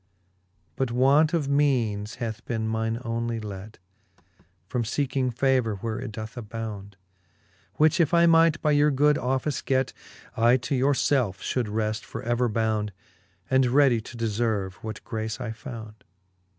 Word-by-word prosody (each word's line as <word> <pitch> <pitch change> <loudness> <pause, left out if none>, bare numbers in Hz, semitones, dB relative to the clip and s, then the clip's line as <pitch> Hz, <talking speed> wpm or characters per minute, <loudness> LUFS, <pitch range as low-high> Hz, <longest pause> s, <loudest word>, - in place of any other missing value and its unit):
But 130 -2 0
want 135 +6 +4
of 165 -5 0
meanes 120 -8 +1
hath 115 -1 -5
beene 110 -2 -2
mine 110 0 -1
onely 115 0 -2
let 105 0 -8 0.9
From 125 +5 -1
feeking 130 +2 -1
favour, 125 -3 +1
where 110 +3 -4
it - - -5
doth 110 +1 -7
abound 110 -3 -6
j - - -31 0.8
Which 155 +3 +3
if 165 -4 +3
I 170 0 +5
might 165 -1 +5
by 150 - +3
your 145 0 +4
good 150 +1 +3
office 130 +2 -1
get, 130 -1 0 0.4
I 120 +3 +4
to 125 +3 -4
your 135 +2 +3
felfe 125 -9 +1
fhould 125 -4 -1
reft 110 0 -1
for - - -7
ever 120 +1 +1
bound, 110 -2 -1 0.5
And 130 -1 +3
readie 130 -2 +4
to 120 - -9
deferve, 110 -4 -1
what 110 0 -7
grace 110 0 -4
I 120 -3 -4
found. 110 -2 -9
120 Hz, 155 wpm, -26 LUFS, 110-135 Hz, 0.9 s, I